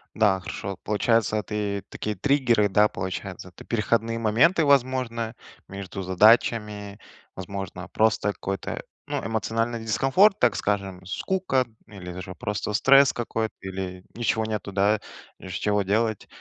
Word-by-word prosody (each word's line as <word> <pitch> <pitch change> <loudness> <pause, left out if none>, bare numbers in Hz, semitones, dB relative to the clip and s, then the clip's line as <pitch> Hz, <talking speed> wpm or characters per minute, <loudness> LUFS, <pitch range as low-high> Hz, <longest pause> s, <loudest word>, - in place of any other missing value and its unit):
Да, 105 -4 +3
хорошо, 95 +1 -6
получается, 110 0 +1
это 105 0 -4
и 100 -1 -1
такие 105 -1 -4
триггеры, 120 -3 +2
да, 105 +2 +5
получается, 95 0 -6
это 90 - -14
переходные 115 0 0
моменты, 130 - +3
возможно, 125 -4 +1 0.3
между 95 0 -7
задачами, 105 +1 +3 0.4
возможно, 95 -1 -6
просто 110 -1 +2
какой-то, 100 0 -4 0.2
ну, - - -3
эмоциональный 115 +1 -1
дискомфорт, 135 - +3
так 120 -5 +3
скажем, 100 -2 -2
скука 135 - 0 0.2
или 90 -3 -8
же 90 0 -7
просто 105 0 -3
стресс 135 +5 +6
какой-то, 115 -2 -2
или 95 -1 -6
ничего 110 -1 0
нету, 105 -2 -4
да, 100 +2 +2 0.4
из 95 -1 -8
чего 105 +2 +1
делать. 110 +2 0
105 Hz, 130 wpm, -25 LUFS, 95-115 Hz, 0.4 s, стресс